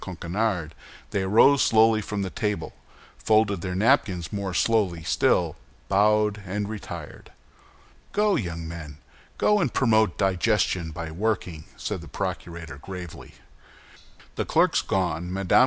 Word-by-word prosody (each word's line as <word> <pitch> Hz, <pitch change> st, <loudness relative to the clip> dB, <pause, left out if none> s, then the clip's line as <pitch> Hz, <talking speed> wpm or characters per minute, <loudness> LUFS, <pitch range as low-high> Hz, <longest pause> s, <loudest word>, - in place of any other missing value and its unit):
Coquenard, 90 Hz, -1 st, -2 dB, 0.4 s
they 100 Hz, -, 0 dB
arose 115 Hz, +9 st, +5 dB
slowly 110 Hz, -1 st, +4 dB
from 105 Hz, -1 st, -3 dB
the 95 Hz, -, -4 dB
table, 105 Hz, -1 st, -3 dB, 0.5 s
folded 110 Hz, -4 st, +2 dB
their 90 Hz, 0 st, -3 dB
napkins 95 Hz, -, +2 dB
more 100 Hz, -2 st, -3 dB
slowly 90 Hz, -4 st, +1 dB
still, -, -, +2 dB, 0.3 s
bowed, 105 Hz, +1 st, +3 dB
and 100 Hz, +2 st, -3 dB
retired. 105 Hz, -1 st, -8 dB, 0.8 s
"Go, 210 Hz, 0 st, +2 dB
young 85 Hz, -, -3 dB
men! 80 Hz, -3 st, -8 dB, 0.4 s
go 210 Hz, 0 st, +3 dB
and 155 Hz, -, +1 dB
promote 110 Hz, -6 st, +2 dB
digestion 95 Hz, -2 st, +1 dB
by 80 Hz, 0 st, -6 dB
working," 90 Hz, -4 st, -2 dB
said -, -, -4 dB
the -, -, -11 dB
procurator, 85 Hz, -5 st, -5 dB
gravely. 90 Hz, 0 st, -9 dB, 1.0 s
The -, -, -1 dB
clerks -, -, +3 dB
gone, 90 Hz, -2 st, -1 dB
Mme. 95 Hz, -1 st, -2 dB
95 Hz, 125 wpm, -25 LUFS, 85-110 Hz, 1.0 s, arose